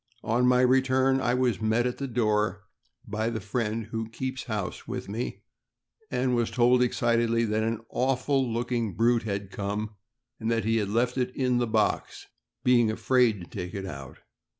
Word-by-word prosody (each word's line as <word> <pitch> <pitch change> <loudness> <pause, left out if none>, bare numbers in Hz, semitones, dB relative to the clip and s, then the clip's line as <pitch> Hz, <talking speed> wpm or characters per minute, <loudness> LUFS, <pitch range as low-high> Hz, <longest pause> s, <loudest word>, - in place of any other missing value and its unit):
On 120 +3 +2
my 125 0 +5
return, 130 +1 +3
I 125 0 +1
was 125 -4 +1
met 110 +2 +2
at 125 - -2
the 140 - -2
door 105 -4 0 0.4
by 110 0 -2
the 115 -1 -3
friend 110 +1 -2
who 110 -1 -3
"keeps 130 +2 -4
house" 105 -6 -4
with - - -5
me, 110 +5 -4 0.7
and 125 -1 0
was 120 -1 +1
told 125 +1 +4
excitedly 115 -1 +2
that 110 0 0
an 115 0 -1
"awful 130 0 0
looking 115 -4 -1
brute 115 +3 +3
had 100 -1 -3
come, 105 +2 -3 0.5
and 110 - -2
that 115 -1 0
he 115 +1 +2
had 105 -3 -1
left 120 +4 +1
it 125 0 +1
in 125 -2 +1
the 120 - +1
box, 110 -1 0 0.4
being 120 -3 +4
afraid 115 -2 +2
to - - -8
take 90 -1 -6
it 95 -1 -4
out." 70 -8 -8
115 Hz, 175 wpm, -27 LUFS, 110-125 Hz, 0.7 s, my